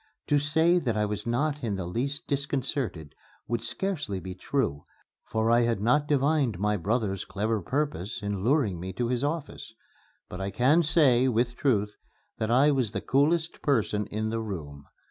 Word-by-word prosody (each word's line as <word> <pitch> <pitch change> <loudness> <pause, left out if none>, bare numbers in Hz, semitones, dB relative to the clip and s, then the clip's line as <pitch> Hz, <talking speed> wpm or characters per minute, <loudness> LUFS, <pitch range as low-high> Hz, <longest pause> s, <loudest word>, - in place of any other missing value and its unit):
To 145 - +4
say 160 +5 +3
that 120 -9 -1
I 105 - +2
was 105 +1 -4
not 145 +4 0
in 105 -4 -1
the 95 -2 -4
least 140 - -3
disconcerted 135 - -2 0.3
would 120 -1 -1
scarcely 145 - -3
be 90 +1 -7
true, 90 - -2 0.4
for 110 +1 0
I 120 +1 +5
had 115 -3 +1
not 145 +8 +2
divined 140 - +2
my 105 +2 +1
brother's 100 0 -1
clever 105 +2 -1
purpose 130 - -2
in 100 -2 -2
luring 120 - +2
me 95 +2 -5
to 120 +4 -2
his 125 +1 0
office. 145 -6 -4 0.5
But 90 - -7
I 95 - -2
can 135 +10 +3
say, 145 -6 +4
with 120 0 +1
truth, 105 -7 0 0.4
that 110 - -1
I 135 +5 +5
was 130 -6 0
the - - -2
coolest 160 +5 +1
person 105 -6 +1
in 110 +1 -2
the 115 - -1
room. 75 -10 -7
120 Hz, 175 wpm, -27 LUFS, 105-145 Hz, 0.5 s, I